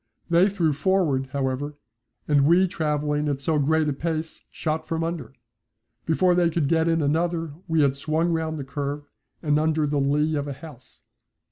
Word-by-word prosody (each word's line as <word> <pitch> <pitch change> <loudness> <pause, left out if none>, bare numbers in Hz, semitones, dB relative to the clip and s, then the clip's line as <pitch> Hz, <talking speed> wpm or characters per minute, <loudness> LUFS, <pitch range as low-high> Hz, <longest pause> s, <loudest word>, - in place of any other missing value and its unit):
They 175 +4 +5
threw 170 -6 +1
forward, 150 -5 +1
however, 140 +1 -2 0.5
and 145 -2 +4
we 180 +3 +5
travelling 150 -2 -1
at 140 -2 -1
so 150 +2 0
great 155 +2 +2
a 145 - 0
pace 160 +2 -4
shot 155 0 -3
from 165 0 -1
under. 160 -7 -4 0.7
Before 180 +3 +3
they 175 -1 +3
could 160 -3 0
get 160 +1 +2
in 165 -2 +2
another 165 +1 0
we 160 -1 +2
had 140 -2 +3
swung 160 +4 0
round 160 -1 -2
the 145 - -4
curve 145 +1 -4 0.4
and 150 -1 +2
under 155 0 +1
the 145 0 0
lee 150 +3 +1
of 145 -1 -2
a 140 - -4
house. 135 -3 -14
155 Hz, 175 wpm, -24 LUFS, 145-165 Hz, 0.7 s, They